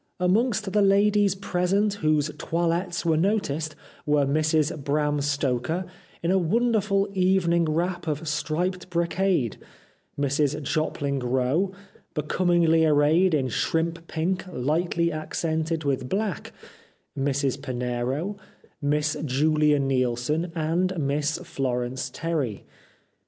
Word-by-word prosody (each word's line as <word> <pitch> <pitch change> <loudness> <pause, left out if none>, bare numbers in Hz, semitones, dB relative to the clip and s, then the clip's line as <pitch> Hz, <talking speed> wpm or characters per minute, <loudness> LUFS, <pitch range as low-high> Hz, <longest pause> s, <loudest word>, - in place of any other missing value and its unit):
Amongst 210 +2 +1
the 210 - +4
ladies 200 0 +4
present 195 +2 0
whose 155 -1 +2
toilettes 170 +1 -1
were 160 -2 +3
noticed 160 -5 0 0.3
were 145 -1 +2
Mrs 155 +1 +1
Bram 145 +1 0
Stoker 140 +4 -1 0.2
* - - -28
in 170 - +1
a 190 - +4
wonderful 205 +1 +1
evening 180 -3 +2
wrap 175 +3 -1
of 155 +1 -2
striped 165 +5 -2
brocade/ 170 - 0 0.6
Mrs 145 +1 +1
Jopling 140 -1 -1
Rowe 130 +9 +1 0.4
'becom 155 +4 -1 0.2
ingly 160 0 +4
arrayed 155 +4 +4
in 135 -3 +1
shrimp 165 +6 -1
pink, 180 +4 -1
hghtly 170 +2 0
accented 160 +1 -2
with 135 -3 -1
black/ 205 0 -2 0.6
Mrs 140 -1 0
Pinero, 130 +8 -2 0.4
Miss 150 +1 +1
JuHa 150 +1 +2
Neilson, 135 +5 0
and 175 +3 0
Miss 145 +1 0
Florence 125 -1 -2
Terry. 145 -8 -3
160 Hz, 110 wpm, -25 LUFS, 145-180 Hz, 0.6 s, the